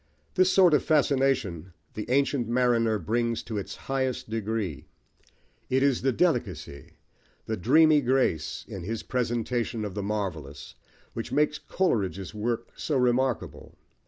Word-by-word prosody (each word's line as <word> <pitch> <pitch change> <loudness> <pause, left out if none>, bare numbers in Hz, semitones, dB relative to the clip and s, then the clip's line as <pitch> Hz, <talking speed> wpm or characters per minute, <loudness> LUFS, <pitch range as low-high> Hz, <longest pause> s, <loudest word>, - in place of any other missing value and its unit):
This 185 0 +4
sort 185 -4 +5
of 150 - +4
fascination 130 - +1 0.2
The 105 - -6
Ancient 135 -2 +1
Mariner 120 -2 +2
brings 115 +2 -1
to 110 -3 -4
its 100 - -6
highest 130 -4 -2
degree: 105 -9 -3 0.8
it 130 +1 +2
is 140 -3 +2
the 135 - +2
delicacy, 120 - -1 0.5
the 110 - -2
dreamy 150 - +5
grace, 125 - 0
in 95 - -7
his 110 +6 -4
presentation 120 -2 -1
of 100 - -5
the 100 - -3
marvellous, 90 -9 -4 0.4
which - - -5
makes 150 0 +1
Coleridge's 100 - -1
work 115 +2 -2
so 150 - -1
remarkable. 125 0 0
120 Hz, 130 wpm, -27 LUFS, 105-135 Hz, 0.8 s, sort